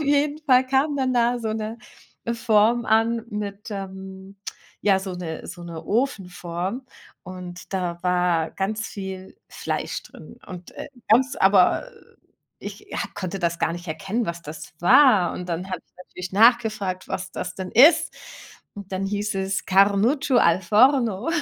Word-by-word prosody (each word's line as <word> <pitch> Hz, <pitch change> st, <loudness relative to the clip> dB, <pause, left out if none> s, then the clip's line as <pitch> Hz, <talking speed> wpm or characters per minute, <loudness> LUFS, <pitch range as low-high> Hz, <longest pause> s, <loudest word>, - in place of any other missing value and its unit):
Auf -, -, -1 dB
jeden 290 Hz, +1 st, +1 dB
Fall 255 Hz, -2 st, +5 dB
kam 275 Hz, +3 st, +1 dB
dann 260 Hz, -2 st, 0 dB
da 240 Hz, 0 st, +2 dB
so 225 Hz, -2 st, -3 dB
'ne 220 Hz, +1 st, -4 dB, 0.6 s
Form 230 Hz, +1 st, +3 dB
an 225 Hz, +1 st, +2 dB
mit, 205 Hz, 0 st, -5 dB
ähm, 190 Hz, 0 st, -8 dB, 0.5 s
ja 195 Hz, -2 st, +4 dB
so 190 Hz, -1 st, -6 dB
'ne 170 Hz, -3 st, -6 dB
so 175 Hz, -1 st, -9 dB
'ne 165 Hz, -2 st, -8 dB
Ofenform. 195 Hz, -2 st, -2 dB, 0.4 s
Und 180 Hz, 0 st, -9 dB
da 175 Hz, -2 st, -3 dB
war 180 Hz, -3 st, +1 dB
ganz 215 Hz, +3 st, -2 dB
viel 190 Hz, -, -8 dB
Fleisch -, -, -4 dB
drin. -, -, -14 dB
Und, 180 Hz, -1 st, -10 dB
äh, -, -, -7 dB, 0.2 s
ganz 260 Hz, +5 st, +3 dB
aber 190 Hz, -, +4 dB, 0.7 s
ich, -, -, -9 dB
ja, -, -, -4 dB, 0.2 s
konnte 185 Hz, 0 st, -4 dB
das 170 Hz, -2 st, -1 dB
gar 165 Hz, -, 0 dB
nicht 175 Hz, +1 st, -8 dB
erkennen, 200 Hz, +8 st, -2 dB
was 170 Hz, 0 st, -4 dB
das 150 Hz, +1 st, -9 dB
war. 205 Hz, -1 st, +5 dB
Und 180 Hz, -, -6 dB
dann 175 Hz, +2 st, -3 dB
habe -, -, -1 dB
ich -, -, -44 dB
natürlich 180 Hz, 0 st, -8 dB
nachgefragt, 215 Hz, -4 st, +3 dB
was 185 Hz, 0 st, -4 dB
das 180 Hz, 0 st, -5 dB
denn 190 Hz, -1 st, -6 dB
ist. 290 Hz, +9 st, +6 dB, 0.6 s
Und 200 Hz, -2 st, -10 dB
dann 190 Hz, +1 st, -2 dB
hieß 205 Hz, +1 st, -2 dB
es 190 Hz, 0 st, -2 dB
Carnuccio 205 Hz, +8 st, +3 dB
Al 170 Hz, +3 st, +3 dB
Forno. 235 Hz, -, +3 dB
195 Hz, 155 wpm, -23 LUFS, 180-230 Hz, 0.7 s, ist